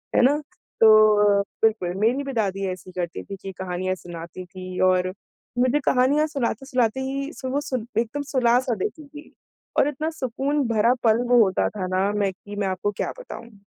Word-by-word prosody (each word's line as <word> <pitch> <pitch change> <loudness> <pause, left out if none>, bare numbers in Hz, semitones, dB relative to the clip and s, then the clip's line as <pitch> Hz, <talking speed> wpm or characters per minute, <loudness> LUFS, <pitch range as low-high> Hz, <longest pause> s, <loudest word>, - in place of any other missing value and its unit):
है - - +5
ना? 285 +3 +4 0.4
तो 215 -2 +6
अ, - - +3 0.2
बिल्कुल 215 -6 +2
मेरी 245 +7 +2
भी 275 - -5
दादी 195 -4 -1
ऐसी 185 0 -9
ही - - -13
करती 170 -1 -5
थी 200 - -7
कि 195 - -6
कहानियाँ 185 0 -2
सुनाती 175 0 -9
थीं 185 0 -8
और 185 0 +1 0.5
मुझे 255 +4 +3
कहानियाँ 280 +5 +3
सुनाते-सुनाते 260 -3 -1
ही 275 +3 -3
सु 260 - -6
वो 280 +3 0
सुन 255 -5 -4
एकदम 235 +5 -2
सुला-सा 245 -1 +3
देती 215 +9 -4
थीं। 295 +1 -12 0.5
और - - +4
इतना 305 +2 -2
सुकून 275 -1 -1
भरा 230 +2 +3
पल 220 -1 +5
वो 245 -1 +6
होता 190 -2 +1
था 190 -3 -4
ना, 185 +2 +1
मैं 205 -2 0
कि 205 +2 -11
मैं 205 -1 -1
आपको 190 +2 -1
क्या - - -2
बताऊँ? 230 - -11
220 Hz, 185 wpm, -24 LUFS, 190-265 Hz, 0.5 s, तो